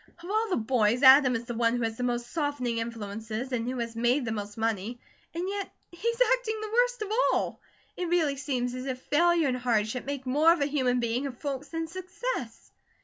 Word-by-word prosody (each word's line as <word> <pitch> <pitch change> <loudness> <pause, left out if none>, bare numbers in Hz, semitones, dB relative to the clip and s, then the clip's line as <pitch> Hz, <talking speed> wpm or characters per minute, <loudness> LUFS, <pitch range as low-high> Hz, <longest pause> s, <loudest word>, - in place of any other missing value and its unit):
Of - - -8
all 440 +1 +1
the 370 - +1
boys, 235 +1 +1
Adam 260 -1 +8
is 230 +1 -3
the 240 - -4
one 230 0 +2
who 240 - -1
has 225 - 0
had - - -18
the 250 - -3
most 240 0 -2
softening 285 -7 -1
influences, 225 +2 -5
and 240 -1 -1
who 255 - -3
has 230 -1 -4
made 240 +3 +2
the 225 - -2
most 205 -1 -5
money, 225 +1 -2 0.4
and 350 +2 -2
yet 400 0 -3 0.2
he's 465 +7 -2
acting 455 -3 -2
the 430 0 -5
worst - - +2
of 420 - -6 0.2
all. - - -1 0.3
It 360 - -3
really 325 -5 +2
seems 255 -3 -2
as 255 +1 -5
if 255 -1 -3
failure 335 +3 +3
and 250 -1 0
hardship 240 -1 0
make 280 -1 -4
more 295 +6 +4
of 340 -3 +1
a - - +3
human 260 -4 +1
being 240 +3 -1
of 250 -3 -8
folks 280 0 -4
than 325 +2 -3
success." 365 - -5
255 Hz, 220 wpm, -28 LUFS, 235-330 Hz, 0.4 s, Adam